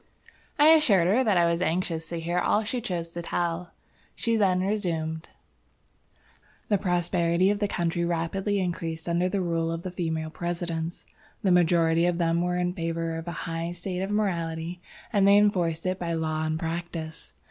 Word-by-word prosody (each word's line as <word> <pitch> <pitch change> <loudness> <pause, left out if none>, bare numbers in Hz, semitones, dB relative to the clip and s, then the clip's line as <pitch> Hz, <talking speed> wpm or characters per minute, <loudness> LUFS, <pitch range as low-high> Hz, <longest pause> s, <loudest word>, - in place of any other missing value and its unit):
I 300 +1 +7
assured 255 - +5
her 215 +9 +3
that 210 -6 +2
I 170 - +5
was 170 +1 +1
anxious 165 -2 -1
to 170 - -3
hear 170 +2 -1
all 210 +4 +2
she 240 +3 -2
chose 175 -7 -3
to 170 +1 -6
tell. 170 0 -2 0.5
She 230 -1 0
then 190 -4 +3
resumed: 170 -5 -2 1.4
"The 205 -2 +3
prosperity 175 0 +2
of 205 - -1
the 205 - +1
country 170 -2 -1
rapidly 175 +4 -1
increased 165 -2 -3
under 175 +2 +1
the 195 0 -1
rule 165 -2 0
of 165 +1 -4
the 185 - -4
female 160 -3 -3
Presidents. 170 -1 -4 0.4
The 190 - +3
majority 170 -1 +4
of 175 -1 0
them 170 -1 +1
were 180 0 0
in 180 0 0
favor 165 -2 -2
of 165 +1 -6
a - - -2
high 165 0 -3
state 180 +1 -4
of 195 - -2
morality, 175 -4 -2 0.3
and 200 -2 +4
they 200 0 +7
enforced 180 -6 +2
it 185 +1 -1
by 170 -1 -2
law 160 -1 -1
and 155 0 -1
practice. 165 -1 -5
175 Hz, 180 wpm, -27 LUFS, 165-185 Hz, 1.4 s, I